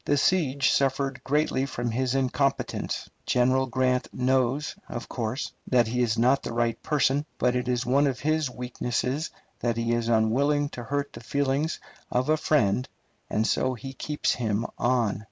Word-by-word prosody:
The 145 - +2
siege 140 -5 +2
suffered 135 -1 0
greatly 140 -2 +1
from 120 -3 -3
his 130 +2 0
incompetence. 135 +1 -1 0.2
General 130 +2 +3
Grant 125 0 0
knows, 130 +4 +1
of 120 - -5
course, 120 +3 -3 0.2
that 125 -2 +4
he 125 +3 -1
is 115 -2 +1
not 130 +4 +4
the - - -5
right 115 -1 0
person; 145 -1 +2
but 125 0 +2
it 125 0 -1
is 125 0 0
one 140 +4 +3
of 130 -3 -2
his 155 -1 +1
weaknesses 125 +3 -2 0.3
that 120 -1 0
he 115 0 0
is 120 -1 0
unwilling 140 +6 +2
to 120 - -7
hurt 140 +2 -2
the - - -8
feelings 140 +3 0 0.3
of 125 +3 0
a 155 - +4
friend, 130 -6 +2 0.4
and 110 - +1
so 130 +2 +1
he 135 +3 -8
keeps 150 +3 -1
him 110 -2 -1
on. 120 -5 +1
130 Hz, 170 wpm, -27 LUFS, 120-140 Hz, 0.4 s, that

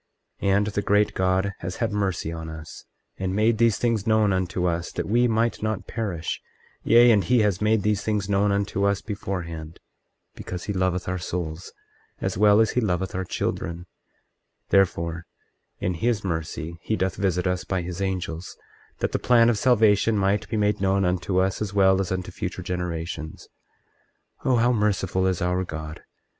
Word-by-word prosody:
24:14 100 - +1
And 100 - +2
the 100 -1 -1
great 105 +1 +2
God 95 +2 +1
has 90 +1 -5
had 115 -2 -1
mercy 95 -5 -1
on 80 -1 -6
us, 80 -1 -9 0.3
and 95 0 -2
made 110 +1 +2
these 115 -3 +4
things 115 -3 0
known 110 -2 +3
unto 90 -1 -1
us 85 0 -1
that - - -3
we 120 +4 +3
might 115 +1 0
not 110 -3 -2
perish; 95 -8 -3 0.4
yea, 120 +1 +6
and 105 -3 +4
he 120 +6 +3
has 105 -3 +1
made 105 -1 +2
these 105 -2 +1
things 105 -3 -1
known 100 0 +2
unto 100 0 -1
us 100 -1 +1
beforehand, 85 -6 -5 0.5
because 90 -1 -7
he 100 - -3
loveth 95 -1 0
our 90 0 -2
souls 85 -1 -5 0.5
as - - -2
well 105 +2 +5
as 110 - +3
he 125 - +1
loveth 95 -3 -1
our 95 - -2
children; 85 -1 -3 0.8
therefore, 85 -3 +1 0.5
in 90 - -1
his 105 +5 0
mercy 80 -1 -4
he 110 - -1
doth 95 -2 -1
visit 90 -2 0
us 90 0 0
by 95 -2 -2
his 90 +2 -5
angels, 90 -3 -3 0.4
that - - 0
the - - -1
plan 120 -1 +5
of 110 - -1
salvation 110 -3 +4
might 100 +1 +1
be 110 - -1
made 105 -1 +1
known 95 0 +2
unto 90 +1 0
us 95 +2 0
as 100 -1 -3
well 95 -1 +4
as 95 - -4
unto 95 -1 -3
future - - -5
generations. 85 -3 -4 1.0
24:15 - - +1
Oh, - - +4
how 120 +1 +3
merciful 95 -4 +1
is 90 -2 0
our 90 +1 0
God! 80 -2 -7
95 Hz, 180 wpm, -25 LUFS, 90-105 Hz, 1.0 s, yea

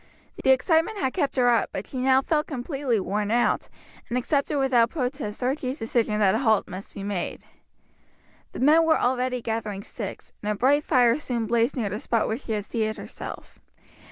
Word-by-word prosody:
The - - +2
excitement 325 +10 +3
had 265 -7 -1
kept 285 -7 -1
her 250 -2 +3
up; 235 -1 +2
but 190 - -5
she 260 - -6
now 265 +1 +4
felt 300 +1 0
completely 270 -3 -1
worn 205 +2 -2
out, 240 +2 +1 0.4
and 245 - 0
accepted 280 +3 0
without 250 -4 +3
protest 255 -6 -4
Archie's 260 +1 -1
decision 225 -3 0
that 195 -3 +4
a 220 - +1
halt 220 -6 +2
must 185 +3 -9
be 200 - -6
made. 200 -3 -3 1.1
The - - -6
men 310 +5 +6
were 320 -1 +3
already 250 -1 0
gathering 215 -3 -3
sticks, 205 -3 -8
and 210 - -1
a - - -1
bright 280 +7 +3
fire 250 -4 +3
soon 240 -6 -2
blazed 235 +1 +1
near 225 -6 -1
the 205 +2 -4
spot 230 -1 0
where 225 - -2
she 230 - -4
had 205 -2 -2
seated 220 -1 -2
herself. - - -9
245 Hz, 190 wpm, -25 LUFS, 220-270 Hz, 1.1 s, men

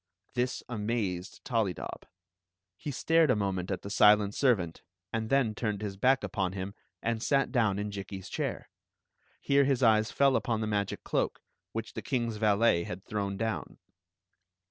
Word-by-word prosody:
This 125 +1 -1
amazed 105 -5 -3
Tollydob. 110 -8 -2 0.7
He - - -6
stared 160 +3 +3
a 125 - +5
moment 95 -3 -1
at 95 - -3
the 100 - -6
silent 105 -1 +5
servant, 100 - +1 0.3
and 110 -1 -2
then 135 -5 +3
turned 105 -2 -2
his 100 -2 -3
back 130 +6 +3
upon 95 -5 -2
h.m 95 +1 -4 0.3
and 115 -1 -1
sat 135 +2 +2
down 110 -7 +2
in 105 0 -3
Jikki's 95 -1 -6
chair. - - -4 0.7
Here 140 0 +3
his 135 -2 +1
eyes 110 -1 +4
fcU 140 -1 +4
upon 115 -2 0
the 110 - -1
magic 100 -2 -2
cloak, - - -1 0.3
which 115 0 -5
the - - -5
kings 120 -4 -1
valet 105 -3 +3
had 90 +3 -7
thrown 100 -2 -2
down. 110 +1 -3
110 Hz, 160 wpm, -30 LUFS, 100-120 Hz, 0.7 s, a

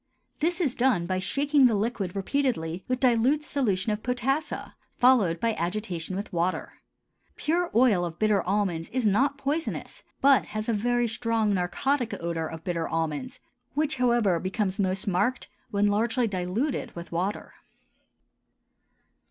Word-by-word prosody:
This 345 +3 0
is 295 -9 +1
done 240 -10 +2
by 185 +1 -1
shaking 280 +6 +3
the 230 - +1
liquid 205 -3 -2
repeatedly 195 - -1
with 255 0 -1
dilute 255 +4 +3
solution 215 -9 0
of 210 0 -2
potassa, 270 +5 -2 0.2
followed 225 -10 +4
by 230 +2 +1
agitation 180 -1 -3
with 200 +1 -5
water. 175 +2 -2 0.6
Pure 345 +3 0
oil 225 -7 +4
of 170 -1 -4
bitter 210 -1 +2
almonds 185 -4 -1
is 255 -2 -1
not 265 +8 +2
poisonous, 290 +4 -3 0.2
but 275 -1 +5
has 215 0 -5
a 230 - +1
very 240 +3 +1
strong 225 -1 0
narcotic 225 +6 0
odor 165 -1 -2
of 160 0 -8
bitter 170 -2 -2
almonds, 165 - -3 0.4
which, 300 -1 0
however, 235 -8 +2
becomes 195 +2 -2
most 190 +1 0
marked 205 +6 0 0.2
when 205 0 +1
largely 225 +4 +2
diluted 205 +8 -2
with 170 0 -8
water. 185 +5 -3
215 Hz, 145 wpm, -27 LUFS, 185-255 Hz, 0.6 s, but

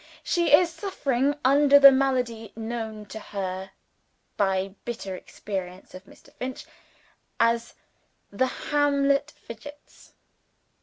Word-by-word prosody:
She 340 -3 +1
is 335 +3 +6
suffering 285 -7 -1
under 285 +1 +6
the 275 -1 +10
malady 250 -5 -1
known 220 -1 -5
to 220 - -8
her 190 -2 -5 0.7
by 195 -1 0
bitter 210 -5 -5
experience 185 -1 -7
of 185 +1 -11
Mr. - - -19
Finch, 255 0 -6 0.7
as 230 0 +1 0.6
the 260 +6 +1
Hamlet 280 0 +1
Fidgets.) 290 +4 -13
240 Hz, 105 wpm, -25 LUFS, 205-280 Hz, 0.7 s, the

